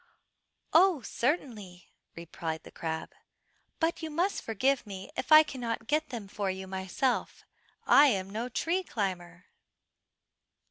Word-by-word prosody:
"Oh, 335 Hz, -5 st, +5 dB
certainly," 220 Hz, -, -3 dB, 0.3 s
replied 165 Hz, -1 st, -5 dB
the -, -, -13 dB
crab, 160 Hz, -1 st, -4 dB, 0.7 s
"but 335 Hz, 0 st, 0 dB
you 320 Hz, -, -4 dB
must 350 Hz, +6 st, 0 dB
forgive 250 Hz, +3 st, 0 dB
me 195 Hz, -1 st, -8 dB
if -, -, -4 dB
I 310 Hz, 0 st, +10 dB
cannot 235 Hz, -6 st, -4 dB
get 305 Hz, +5 st, 0 dB
them 230 Hz, -5 st, -6 dB
for 200 Hz, 0 st, -3 dB
you 190 Hz, 0 st, -4 dB
myself. 190 Hz, +7 st, -2 dB, 0.4 s
I 290 Hz, +1 st, +7 dB
am 195 Hz, -7 st, 0 dB
no 230 Hz, +4 st, -3 dB
tree 335 Hz, +9 st, 0 dB
climber." 185 Hz, -, -4 dB
225 Hz, 130 wpm, -29 LUFS, 190-295 Hz, 0.7 s, I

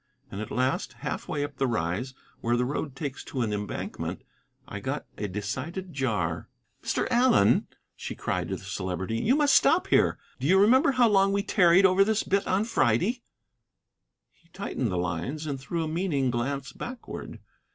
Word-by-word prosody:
And 100 Hz, -, -5 dB
at 110 Hz, -, -5 dB
last, 130 Hz, +1 st, -1 dB
half -, -, -3 dB
way 145 Hz, -, -1 dB
up 145 Hz, -2 st, -6 dB
the 135 Hz, -, +1 dB
Rise, 110 Hz, +5 st, -2 dB, 0.2 s
where 120 Hz, +1 st, +1 dB
the 125 Hz, -, +1 dB
road 140 Hz, +1 st, -3 dB
takes 140 Hz, -2 st, -5 dB
to 130 Hz, -, -3 dB
an 105 Hz, -2 st, -1 dB
embankment, 105 Hz, -1 st, -4 dB, 0.4 s
I -, -, -6 dB
got -, -, -3 dB
a 105 Hz, -, -3 dB
decided 130 Hz, -, -5 dB
jar. 100 Hz, -, -1 dB, 0.3 s
"Mr. -, -, -1 dB
Allen," 240 Hz, -, +4 dB, 0.3 s
she -, -, -6 dB
cried -, -, -2 dB
to -, -, -1 dB
the -, -, -10 dB
Celebrity, 95 Hz, +4 st, -3 dB
"you 250 Hz, -, +3 dB
must 295 Hz, -1 st, +3 dB
stop -, -, +5 dB
here. -, -, +3 dB, 0.2 s
Do 130 Hz, -, -1 dB
you 190 Hz, +3 st, +5 dB
remember 255 Hz, +7 st, +5 dB
how 250 Hz, -2 st, +5 dB
long 195 Hz, -2 st, +4 dB
we 200 Hz, 0 st, +1 dB
tarried 185 Hz, -2 st, +5 dB
over 190 Hz, +1 st, +5 dB
this 220 Hz, +1 st, +1 dB
bit 200 Hz, +1 st, 0 dB
on 190 Hz, +3 st, +2 dB
Friday?" 200 Hz, -, +1 dB, 1.1 s
He 170 Hz, -, -32 dB
tightened 150 Hz, -, -3 dB
the 90 Hz, -, -1 dB
lines 90 Hz, -, -3 dB
and 140 Hz, -3 st, -3 dB
threw 165 Hz, +5 st, -3 dB
a -, -, -3 dB
meaning 155 Hz, -6 st, 0 dB
glance 135 Hz, +3 st, -2 dB
backward. 245 Hz, 0 st, -7 dB
140 Hz, 180 wpm, -27 LUFS, -, 1.1 s, stop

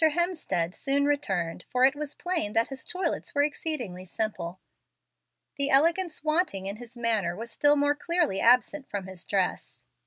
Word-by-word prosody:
Hemstead 315 Hz, -, +1 dB
soon 280 Hz, +4 st, +1 dB
returned, 180 Hz, -, -1 dB
for 255 Hz, 0 st, +4 dB
it 270 Hz, -, +4 dB
was 295 Hz, -1 st, -5 dB
plain 345 Hz, -, -1 dB
that 225 Hz, +1 st, +2 dB
his 270 Hz, -1 st, -7 dB
toilets 360 Hz, -5 st, -3 dB
were 285 Hz, -, +4 dB
exceedingly 270 Hz, -, -3 dB
simple. 190 Hz, -2 st, -3 dB, 1.0 s
The 280 Hz, 0 st, +2 dB
elegance 330 Hz, +4 st, +3 dB
wanting 310 Hz, -, 0 dB
in 200 Hz, +2 st, -4 dB
his 240 Hz, +1 st, -11 dB
manners 215 Hz, -7 st, 0 dB
was 230 Hz, +2 st, -6 dB
still 290 Hz, 0 st, +4 dB
more 290 Hz, 0 st, +2 dB
clearly 305 Hz, -, 0 dB
absent 255 Hz, +4 st, +3 dB
from 200 Hz, -2 st, -4 dB
his 190 Hz, -2 st, -8 dB
dress. 190 Hz, -3 st, -2 dB
270 Hz, 160 wpm, -27 LUFS, 200-300 Hz, 1.0 s, for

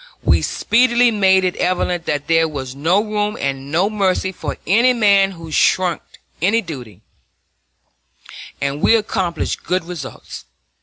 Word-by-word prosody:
We -, -, +3 dB
speedily 240 Hz, 0 st, +2 dB
made 190 Hz, -3 st, +3 dB
it 180 Hz, -1 st, -1 dB
evident 180 Hz, -1 st, -1 dB
that 145 Hz, -1 st, -2 dB
there 165 Hz, +1 st, +2 dB
was 135 Hz, -4 st, -6 dB
no 165 Hz, +9 st, +1 dB
room 210 Hz, -1 st, -2 dB
and 135 Hz, 0 st, -4 dB
no 175 Hz, +5 st, +2 dB
mercy 195 Hz, -3 st, 0 dB
for 185 Hz, -, -6 dB
any 235 Hz, +7 st, +4 dB
man 200 Hz, -4 st, +3 dB
who 165 Hz, -2 st, -11 dB
shirked 180 Hz, +3 st, 0 dB, 0.2 s
any 225 Hz, +6 st, +2 dB
duty, 120 Hz, -, -9 dB, 1.6 s
and 140 Hz, +1 st, -3 dB
we -, -, +5 dB
accomplished 190 Hz, -6 st, -2 dB
good 180 Hz, -1 st, -1 dB
results. 170 Hz, -6 st, -9 dB
185 Hz, 140 wpm, -18 LUFS, 155-210 Hz, 1.6 s, we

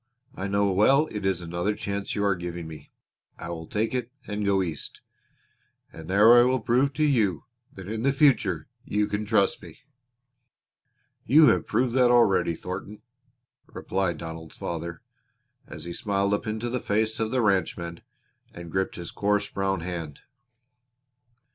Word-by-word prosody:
I 95 Hz, -, -4 dB
know 100 Hz, 0 st, +1 dB
well 135 Hz, +11 st, +4 dB
it 105 Hz, -2 st, -2 dB
is 95 Hz, -2 st, 0 dB
another 85 Hz, +5 st, -2 dB
chance 100 Hz, -1 st, -4 dB
you 100 Hz, -, -1 dB
are 100 Hz, -2 st, +2 dB
giving 85 Hz, -1 st, -6 dB
me. 75 Hz, -3 st, -11 dB, 0.5 s
I 85 Hz, -, -7 dB
will 80 Hz, -1 st, -6 dB
take 110 Hz, +3 st, -1 dB
it 125 Hz, -1 st, -3 dB
and 105 Hz, 0 st, -3 dB
go 100 Hz, -1 st, +2 dB
East, 80 Hz, -5 st, -6 dB, 0.9 s
and 80 Hz, +1 st, -10 dB
there 105 Hz, +5 st, +7 dB
I 120 Hz, -, +8 dB
will 130 Hz, +1 st, +2 dB
prove 125 Hz, +4 st, +2 dB
to 155 Hz, -, 0 dB
you 110 Hz, -, +2 dB, 0.3 s
that 95 Hz, -1 st, -9 dB
in 110 Hz, +1 st, -3 dB
the 140 Hz, +3 st, +3 dB
future 120 Hz, -, +2 dB, 0.2 s
you 105 Hz, 0 st, 0 dB
can 105 Hz, +1 st, -3 dB
trust 105 Hz, -2 st, +2 dB
me." 145 Hz, -, -13 dB, 1.4 s
"You 150 Hz, +1 st, +6 dB
have -, -, +1 dB
proved 125 Hz, -1 st, +1 dB
that 125 Hz, -1 st, +4 dB
already, 105 Hz, -8 st, +3 dB
Thornton," 100 Hz, +5 st, -7 dB, 0.6 s
replied 95 Hz, -3 st, -2 dB
Donald's 80 Hz, 0 st, -8 dB
father, 85 Hz, 0 st, -5 dB, 0.6 s
as -, -, -9 dB
he 85 Hz, -, -6 dB
smiled 100 Hz, +1 st, 0 dB
up 105 Hz, -, -2 dB
into 110 Hz, +2 st, -3 dB
the 125 Hz, +1 st, -2 dB
face 110 Hz, +1 st, 0 dB
of 110 Hz, -1 st, 0 dB
the 125 Hz, 0 st, +1 dB
ranchman 90 Hz, -4 st, -1 dB, 0.5 s
and 85 Hz, -1 st, -9 dB
gripped 95 Hz, +2 st, -1 dB
his 85 Hz, -1 st, -7 dB
coarse 105 Hz, 0 st, 0 dB
brown 95 Hz, -2 st, -1 dB
hand. 85 Hz, -4 st, -6 dB
100 Hz, 160 wpm, -26 LUFS, 85-110 Hz, 1.4 s, I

